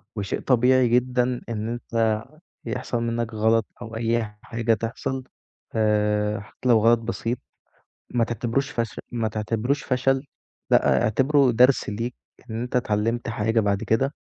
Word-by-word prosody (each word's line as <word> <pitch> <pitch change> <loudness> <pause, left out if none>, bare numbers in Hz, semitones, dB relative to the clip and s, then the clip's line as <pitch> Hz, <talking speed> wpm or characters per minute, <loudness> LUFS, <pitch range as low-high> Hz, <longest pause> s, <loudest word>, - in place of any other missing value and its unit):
وشيء 100 -2 -2
طبيعي 125 0 +4
جدًا 125 +1 +1
إن 110 0 -3
أنت 115 -2 0 0.4
يحصل 125 -2 -2
منّك 115 0 -2
غلط 110 +1 +2 0.2
أو 115 -1 -7
أي 115 -2 -1
حاجة 115 0 0
تحصل 120 +4 -3 0.5
آآ 105 -1 +1
حتّى 110 +4 -5
لو 115 -2 +6
غلط 115 +2 +5
بسيط 115 +1 -3 0.7
ما 120 -2 +1
تعتبروش 120 +4 -1
فش 115 -2 -3
ما 115 -2 -1
تعتبروش 110 +5 -1
فشل 130 +1 +1 0.5
لأ، - - +4
اعتبره 135 +4 +3
درس 125 +2 +4
ليك 115 +4 -3 0.3
إن 110 +1 -3
أنت 125 +1 -4
اتعلّمت 115 0 0
حاجة 115 0 +1
بَعد 100 -2 +1
كده، 135 +6 +1
115 Hz, 140 wpm, -24 LUFS, 110-125 Hz, 0.7 s, لو